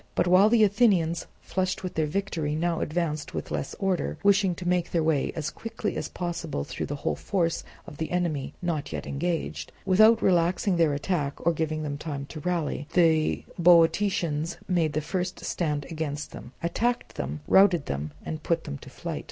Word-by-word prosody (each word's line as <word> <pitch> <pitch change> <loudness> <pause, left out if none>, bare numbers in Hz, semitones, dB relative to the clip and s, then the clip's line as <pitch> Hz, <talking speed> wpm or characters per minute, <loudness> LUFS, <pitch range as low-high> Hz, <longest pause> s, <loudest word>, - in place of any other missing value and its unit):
But - - +2
while 185 +4 +6
the 225 -1 +5
Athenians, 195 -6 +3 0.2
flushed 185 0 -2
with 185 - -4
their 155 -1 0
victory, 160 -3 -2
now 170 +1 0
advanced 155 -2 -2
with - - -4
less - - -3
order, 190 -6 -1
wishing 200 -2 +4
to 175 +1 -6
make 175 -1 +1
their 165 -2 +1
way 155 -3 +1
as 155 -2 -3
quickly 225 -2 -4
as - - -3
possible 170 - -3
through - - -5
the 145 - -3
whole 140 - -1
force 170 -4 -1 0.2
of 145 - -10
the 160 - -3
enemy 170 -6 -1
not 165 -5 -2
yet - - -4
engaged, 140 - -3
without 215 +4 +6
relaxing 180 +1 +2
their 160 -4 +3
attack 150 -2 -2
or 170 - +4
giving 155 -1 -2
them 145 -1 -4
time 145 -3 -4
to 155 - -7
rally, 155 -3 -2
the 160 -3 +3 0.2
Boeotians 170 -1 +3
made 170 -5 +1
the 155 - 0
first 180 +3 -3
stand 150 -4 -1
against 150 -2 -4
them, - - -10
attacked 240 +8 -1
them, 75 +3 -4
routed 190 -5 +5
them, 70 +2 -3
and 155 -1 -4
put 165 +1 0
them 70 - -6
to - - -12
flight. - - -5
170 Hz, 185 wpm, -27 LUFS, 150-180 Hz, 0.2 s, while